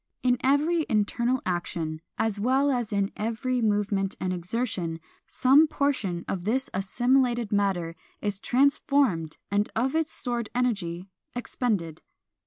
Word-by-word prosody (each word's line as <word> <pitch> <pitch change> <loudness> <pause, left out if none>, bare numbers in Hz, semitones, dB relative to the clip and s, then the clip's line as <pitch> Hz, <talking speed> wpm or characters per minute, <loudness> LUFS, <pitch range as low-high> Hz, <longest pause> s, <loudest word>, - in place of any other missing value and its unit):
In 250 -1 +3
every 300 +5 +2
internal 235 +3 +1
action, 165 -3 -2 0.2
as 215 -2 0
well 265 +6 +2
as 240 -4 -1
in 200 -1 0
every 230 +3 -1
movement 205 -2 +1
and 185 0 -1
exertion, 180 -2 -2 0.3
some 280 +5 +5
portion 255 - -1
of 180 -2 -3
this 255 +7 -1
assimilated 240 +4 +1
matter 190 -5 0 0.2
is 205 -2 -2
transformed 255 - +2
and 205 +1 +1
of 255 +4 +1
its 320 0 0
stored 240 -3 -3
energy 195 -7 -1 0.2
expended. 205 -10 -2
220 Hz, 125 wpm, -27 LUFS, 190-255 Hz, 0.3 s, some